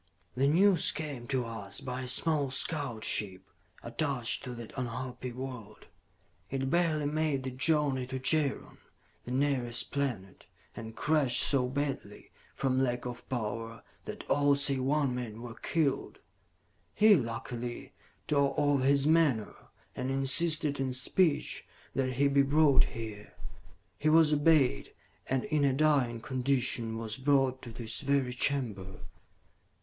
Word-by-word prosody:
"The 135 +2 +1
news 180 +2 +4
came 145 -6 -6
to 130 -3 -1
us 100 -4 -5
by 130 -2 -5
a 130 - -6
small 145 +2 +3
scout 130 -5 -3
ship 95 -3 0 0.4
attached 125 -1 -2
to 125 -1 -6
that 115 -2 -9
unhappy 125 0 -5
world. 125 -4 -8 0.6
It 135 0 -2
barely 165 -3 +1
made 150 -2 0
the 130 - -4
journey 135 -1 +1
to 130 +1 -4
Jaron, 140 +2 0 0.5
the 120 - -6
nearest 130 -3 0
planet, 120 -10 -4 0.3
and 110 0 -8
crashed 145 -6 +2
so 130 -3 +2
badly, 135 -6 -4 0.2
from 130 -1 0
lack 125 -2 -1
of 125 -1 -7
power, 115 -2 -4 0.2
that - - -8
all 145 0 +3
save 140 -2 +1
one 140 0 +1
man 120 -3 -5
were 120 -1 -8
killed. 150 +2 -1 0.8
"He, 215 0 +6
luckily, 120 -2 -4 0.3
tore 140 -2 +1
off 145 -2 +2
his 140 +1 +3
menore, 150 -9 +1 0.3
and 130 +1 -3
insisted 140 +2 +2
in 130 -1 -1
speech 145 +5 +1 0.3
that 130 -1 -1
he 140 +3 +2
be 140 0 +3
brought 145 0 +4
here. 110 -2 -8 0.6
He 155 - +2
was 155 -1 +5
obeyed, 145 -3 +2 0.3
and, 130 -1 0
in 150 -2 0
a 140 -2 +3
dying 135 -5 +2
condition, 125 -3 -1
was 115 +1 -5
brought 135 -1 +2
to 120 - -9
this 115 -1 -5
very 140 -3 0
chamber." 115 -9 -2
130 Hz, 140 wpm, -30 LUFS, 120-145 Hz, 0.8 s, He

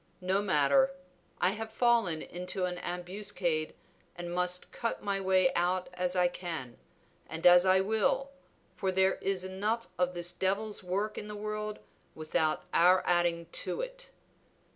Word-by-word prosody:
No 190 +2 +1
matter, 205 - +3 0.4
I 180 - +3
have 220 +1 -6
fallen 225 -8 +2
into 180 +1 -3
an 180 -1 -4
ambuscade 180 -3 -2 0.4
and 175 0 -6
must 180 0 0
cut 230 - -3
my 200 -1 -1
way 185 -1 +3
out 180 +1 0
as 180 0 -2
I 180 -1 +4
can, 165 -9 -6 0.5
and 160 +1 -6
as 180 +1 +8
I 190 0 +5
will, 220 +7 0 0.4
for 190 +1 -1
there 190 0 +2
is 190 -1 0
enough 210 +5 -2
of 180 0 +1
this 175 0 -2
Devil's 205 +3 -1
work 200 +4 -2
in 210 - -7
the 210 - -6
world 215 0 -4 0.4
without 155 0 0
our 180 +2 +5
adding 175 -1 +1
to - - 0
it." - - -7
185 Hz, 150 wpm, -30 LUFS, 175-210 Hz, 0.5 s, as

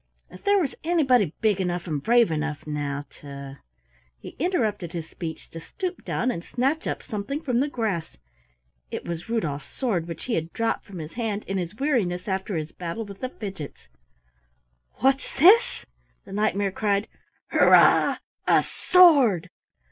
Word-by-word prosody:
If 185 - -13
there 405 0 +4
was 320 -9 0
anybody 265 - +3
big 210 -3 +2
enough 175 -1 -2
and 150 -5 -2
brave 235 - +4
enough, 155 -1 -3
now, 145 -1 -3
to 140 -1 -9 0.3
" - - -37
He - - -9
interrupted 220 - -1
his 165 -2 -5
speech 160 -2 -7
to 165 - -7
stoop 365 - -5
down 255 - 0
and 170 - -5
snatch 270 - -1
up - - -3
something 215 +7 -4
from 255 -7 0
the 280 - +2
grass. 215 - -3 0.7
It - - -5
was 170 +4 -5
Rudolf's 155 -12 -2
sword 195 -11 -1
which 170 - -7
he 250 - -2
had 165 -3 -2
dropped 230 0 -1
from 195 -3 -10
his 155 -1 -7
hand 220 -3 -2
in 195 0 -2
his 175 +2 -5
weariness 215 -10 0
after 190 -1 -2
his 155 0 -4
battle 180 +6 -5
with 200 -1 -10
the 255 - -3
Fidgets. 190 - -8 1.1
"What's 270 +1 +2
this?" 445 - +5 0.4
the - - -12
Knight 210 +1 +1
mare 200 -1 0
cried. 200 0 0 0.4
"Hurrah, - - +6 0.3
a - - +5
sword!" 275 - +5
200 Hz, 165 wpm, -25 LUFS, 165-250 Hz, 1.1 s, Hurrah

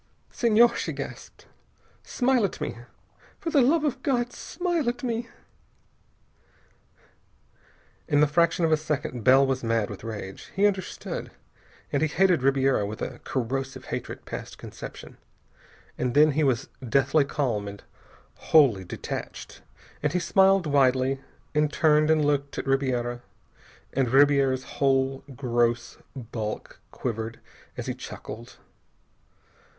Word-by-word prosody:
"Senhor!" 235 0 +4
she - - -3
gasped. - - -8 0.6
"Smile 255 -2 +1
at 195 - -2
me! - - -3 0.6
For 330 - -3
the 285 - +5
love 295 +5 +3
of 275 -3 -1
God, 245 -3 0
smile 345 -6 -1
at 245 +1 -5
me!" 235 -1 -2 2.8
In 145 -3 +3
the 150 - +6
fraction 165 +3 +2
of 160 - +1
a 155 - +5
second, 145 -6 -3
Bell 135 +3 +6
was 130 -1 -1
mad 115 -3 0
with 100 - -9
rage. 105 -4 -7
He 200 +1 +3
understood, 195 -3 -2 0.6
and 140 - +1
he 160 - +3
hated 180 -1 +3
Ribiera 135 -3 +2
with 105 +2 -5
a - - -5
corrosive 130 +1 -3
hatred - - -5
past - - -7
conception. - - -10 0.8
And 125 0 -1
then 150 +1 +6
he 155 +2 +1
was 130 -2 +1 0.2
deathly 140 +4 +3
calm, 125 -8 -2
and 100 0 -9 0.7
wholly 130 -12 +5
detached, - - -7 0.4
and - - 0
he 180 - +2
smiled 195 0 +4
widely, 135 -2 +2 0.3
and 150 0 +2
turned 155 -1 +3
and 155 -2 +3
looked 145 -1 0
at - - -3
Ribiera, 125 -3 0 0.7
and 130 -2 +1
Ribiera's 135 -1 +4
whole 135 0 0
gross 120 -2 0 0.2
bulk 115 -4 -6
quivered 115 -1 -4 0.4
as - - -4
he - - -2
chuckled. 115 +3 -9
140 Hz, 130 wpm, -26 LUFS, 125-170 Hz, 2.8 s, the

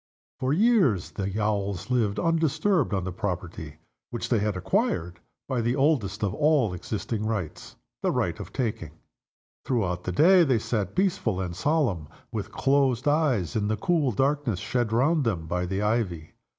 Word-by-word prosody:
For 130 0 0
years 180 - +3
the 100 +1 -3
Owls 100 0 -1
lived 110 -5 +1
undisturbed 165 - +1
on 95 -3 0
the 90 - -3
property 90 -5 -5 0.3
which 120 - -4
they 115 - +3
had 105 -2 -1
acquired 90 -1 -1 0.3
by 125 -3 -1
the 120 +2 0
oldest 130 -9 +1
of 100 -2 0
all 145 -6 +2
existing 105 +4 -4
rights 105 -8 -4 0.3
the - - +1
right - - -1
of - - -8
taking. 105 - -3 0.7
Throughout 95 -9 -1
the 90 - -1
day 175 - +6
they 135 -6 +2
sat 105 -3 -2
peaceful 175 - 0
and 90 -2 -3
solemn, 120 - 0 0.2
with - - -4
closed 135 -2 +1
eyes, 145 - +1
in 105 -2 0
the 110 0 0
cool 155 - +1
darkness 135 -2 0
shed 120 +1 -1
round 140 +7 +2
them 95 -9 -1
by 90 +2 -2
the 95 +3 -2
ivy. 100 -8 -1
110 Hz, 165 wpm, -26 LUFS, 95-140 Hz, 0.7 s, day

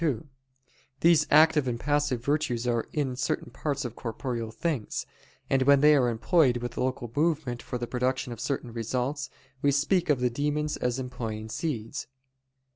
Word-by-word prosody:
2: 150 -6 0 0.8
These 165 -2 +5
active 155 -2 +5
and 120 -1 -2
passive 145 -3 0
virtues 140 -5 0
are 120 -2 0
in 135 -4 -1
certain 125 -1 -2
parts 140 0 -2
of 120 -1 -5
corporeal 115 -1 -4
things: 130 0 -2 0.4
and 135 - +2
when 140 +1 +5
they 150 0 +7
are 125 -4 +3
employed 125 +2 +3
with 120 0 -5
local 125 -2 -2
movement 150 -6 0
for 125 - -4
the 120 - -3
production 125 +1 -1
of 115 - -11
certain 125 -4 -3
results, 125 +5 -2 0.3
we 145 - +3
speak 160 +6 +1
of 145 -4 +3
the 125 -1 +1
demons 150 +3 -1
as 125 0 -1
employing 115 -4 -5
seeds. 115 -5 -3
130 Hz, 165 wpm, -28 LUFS, 120-150 Hz, 0.8 s, they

